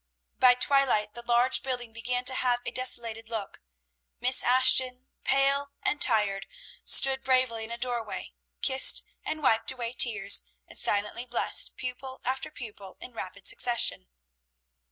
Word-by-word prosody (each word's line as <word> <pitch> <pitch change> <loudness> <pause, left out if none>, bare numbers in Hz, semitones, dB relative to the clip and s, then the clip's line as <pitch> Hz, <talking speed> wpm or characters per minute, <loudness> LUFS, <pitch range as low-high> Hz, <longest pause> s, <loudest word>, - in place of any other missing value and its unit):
By 250 -1 +5
twilight 250 -6 +1
the 240 - -9
large 240 +2 +1
building 245 -3 -5
began 245 +2 -4
to 260 - +5
have 245 -1 -1
a - - -4
desolated 230 -3 -2
look. 220 -4 -6 0.6
Miss 255 +1 +3
Ashton, 255 0 +3
pale 275 +1 +1
and 300 - -1
tired, 210 -5 +1 0.4
stood 265 0 +4
bravely 255 -4 0
in - - -13
a 235 - -6
doorway, 240 -3 -5 0.3
kissed 265 -1 +4 0.2
and 310 -1 -6
wiped 225 -4 +1
away 240 -2 -6
tears, 215 -5 +3 0.3
and - - -8
silently 210 +4 -2
blessed 240 - +2
pupil 260 +1 -7
after 265 +1 -3
pupil 205 -5 -11
in 250 - -12
rapid 200 -2 -9
succession. 235 - +1
245 Hz, 140 wpm, -27 LUFS, 225-260 Hz, 0.6 s, By